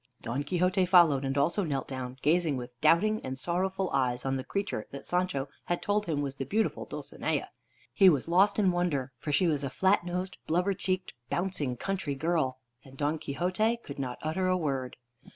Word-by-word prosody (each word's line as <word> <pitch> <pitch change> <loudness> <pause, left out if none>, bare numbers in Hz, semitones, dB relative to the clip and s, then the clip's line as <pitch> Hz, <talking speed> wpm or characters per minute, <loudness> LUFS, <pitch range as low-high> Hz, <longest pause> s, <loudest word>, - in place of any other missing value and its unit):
Don 120 +4 -2
Quixote 180 +3 +2
followed, 170 -7 +6
and 135 +1 -1
also 165 +8 +2
knelt 140 -6 -2
down, 130 -1 -5
gazing 160 -2 +2
with 125 0 -6
doubting 205 +8 +4
and 130 0 -4
sorrowful 185 +5 -1
eyes 125 -2 0
on 135 0 0
the 130 - -3
creature 195 - -3
that 140 - -8
Sancho 180 -6 0 0.2
had 175 - -1
told 205 +1 0
him 145 -3 0
was 140 -1 -4
the - - -2
beautiful 215 - -1
Dulcinea. - - -3 0.4
He 195 -2 +7
was 145 -4 +1
lost 185 +4 +4
in 195 -4 +4
wonder, 165 -7 -1
for 150 - -3
she 165 +6 +3
was 150 -4 +1
a 135 - -1
flat 190 +7 +2
nosed, 180 +2 -4
blubber 180 +5 +2
cheeked, 185 -1 -2 0.2
bouncing 170 -9 -1
country 190 -3 -2
girl, 155 -3 0 0.3
and 135 0 -15
Don 150 +2 0
Quixote 185 +10 0
could 140 - -8
not 125 -2 -3
utter 165 +4 0
a 185 0 +3
word. 135 -6 -2
160 Hz, 190 wpm, -29 LUFS, 135-185 Hz, 0.4 s, He